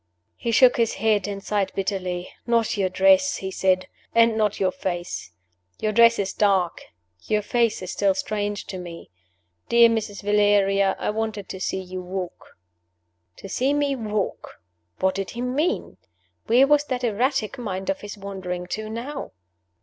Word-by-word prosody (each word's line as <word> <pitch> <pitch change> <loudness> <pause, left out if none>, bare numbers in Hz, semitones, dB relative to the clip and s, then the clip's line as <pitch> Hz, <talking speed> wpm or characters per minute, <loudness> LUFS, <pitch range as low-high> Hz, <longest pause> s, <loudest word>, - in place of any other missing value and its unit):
He 235 - -4
shook 245 +2 +5
his 230 -2 +1
head, 215 -3 +1
and 200 -1 -5
sighed 200 -3 0
bitterly. 185 -2 -3
"Not 230 -1 +2
your 195 -3 +1
dress," 285 +8 +4
he 190 0 -5
said; 185 -1 +1 0.3
"and 230 -1 +5
not 210 -2 0
your 185 -1 +2
face. 175 - -4 0.5
Your 215 - 0
dress 230 +1 +6
is 195 -1 -2
dark. 195 -4 +1 0.4
Your 210 -1 +1
face 230 -2 +1
is 185 - -5
still 195 -2 +2
strange 205 +1 -2
to 185 - -6
me. 170 - -9 0.6
Dear 235 0 +7
Mrs. 215 -3 -3
Valeria, 200 -1 +3
I - - -1
wanted 215 -2 -3
to 190 - -6
see 190 0 -2
you 185 0 -6
walk." 180 0 -7 0.8
To - - -9
see 265 +8 0
me 285 -1 +1
walk! 210 - -4 0.4
What 190 0 +2
did 195 -1 -3
he - - -2
mean? 290 +9 -1 0.5
Where 245 +4 +6
was 295 +1 +3
that 255 -3 -3
erratic 245 +2 0
mind 195 -1 -2
of 290 - -5
his 205 0 -8
wandering 190 -3 -5
to 215 0 -4
now? 250 +6 -6
205 Hz, 165 wpm, -24 LUFS, 190-235 Hz, 0.8 s, Dear